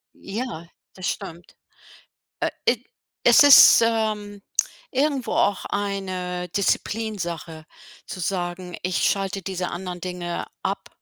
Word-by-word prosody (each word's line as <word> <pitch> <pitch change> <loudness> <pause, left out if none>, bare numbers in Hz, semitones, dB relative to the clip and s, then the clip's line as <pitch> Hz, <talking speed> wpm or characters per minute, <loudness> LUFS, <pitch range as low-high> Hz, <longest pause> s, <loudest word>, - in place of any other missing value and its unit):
Ja, 195 -5 -6 0.3
das 185 -1 -5
stimmt. 170 +1 -6 0.9
Äh, - - +1 0.2
id 240 0 +2 0.4
es 330 - +8
ist, 285 -4 +9
ähm, 210 -3 -1 0.5
irgendwo 275 -2 0
auch 200 -2 +1
eine 185 -3 -3
Disziplinsache 180 -6 -2 0.4
zu - - -7
sagen: 175 0 -3
„Ich 180 0 0
schalte 195 -1 0
diese 185 -1 -3
anderen 180 0 -6
Dinge 175 -1 -4 0.2
ab, - - -3
190 Hz, 110 wpm, -23 LUFS, 180-210 Hz, 0.9 s, ist